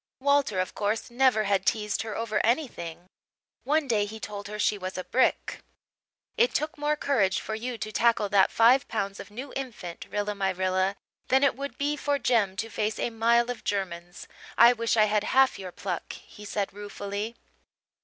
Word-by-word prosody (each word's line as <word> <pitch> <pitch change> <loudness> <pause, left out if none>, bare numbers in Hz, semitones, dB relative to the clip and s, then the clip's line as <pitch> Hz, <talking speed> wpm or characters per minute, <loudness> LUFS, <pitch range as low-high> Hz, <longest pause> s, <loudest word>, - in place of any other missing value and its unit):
Walter, 280 -7 +2
of 185 - -2
course, 215 +3 -2
never 245 -3 +3
had 195 -1 +1
teased 210 -1 0
her 220 -2 -5
over 220 -2 -1
anything; 225 - -1 0.6
one 300 0 +1
day 215 -4 +2
he 220 +2 -8
told 205 -1 -6
her 210 +1 -6
she 210 - +2
was 185 -1 -6
a 185 - -3
brick. 255 +6 +1 0.8
"It 480 +2 +3
took 310 +3 -1
more 295 0 0
courage 230 -11 +1
for 220 - -5
you 235 +2 -4
to 215 -1 -5
tackle 230 -2 +2
that 195 -2 +4
five 250 +4 +4
pounds 200 -3 -3
of - - -9
new 255 +6 -8
infant, 225 -10 -6
Rilla 205 0 -2
my 195 -1 -1
Rilla, 185 +1 0 0.3
than 265 +2 +3
it 280 - +3
would 280 +1 -6
be 290 +1 0
for 290 -1 0
Jem 220 -8 +1
to 225 +3 -3
face 215 +1 -1
a 240 - -1
mile 235 +2 +3
of 245 - -8
Germans. 175 -3 -4 0.3
I 235 +2 +8
wish 230 -1 0
I 215 - +6
had 210 0 +1
half 265 -4 +4
your 185 -2 -7
pluck," 180 -1 -5
he 210 - -13
said 205 -1 -2
ruefully. 205 +2 -5
215 Hz, 190 wpm, -27 LUFS, 200-250 Hz, 0.8 s, I